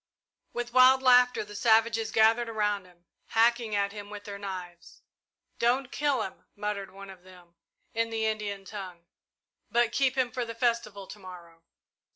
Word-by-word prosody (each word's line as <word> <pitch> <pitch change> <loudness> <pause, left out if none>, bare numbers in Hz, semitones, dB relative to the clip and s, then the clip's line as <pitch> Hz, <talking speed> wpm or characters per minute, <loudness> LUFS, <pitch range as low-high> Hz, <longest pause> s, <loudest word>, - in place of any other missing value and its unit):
With 240 0 -5
wild 260 +1 +6
laughter 250 -2 +5
the 205 - -11
savages 225 0 +3
gathered 225 +2 +3
around 210 -3 -1
him, 175 -1 -22 0.2
hacking 230 -1 +2
at 200 0 +1
him 205 -1 -9
with 205 -1 -8
their 200 -1 -8
knives. 180 -3 -8 0.6
"Don't 250 +2 +1
kill 285 -6 0
him," 190 - -9
muttered 205 -1 -4
one 195 0 -11
of 185 -2 -14
them, 180 -2 -17 0.4
in 230 0 0
the 225 -1 -1
Indian 210 -2 -3
tongue, 185 -4 -8 0.6
"but 235 -1 +2
keep 265 +1 +1
him 250 -2 +1
for 250 - -2
the 230 -1 -7
festival 230 -4 -1
to 210 - -11
morrow!" 175 -3 -12
215 Hz, 165 wpm, -28 LUFS, 195-235 Hz, 0.6 s, wild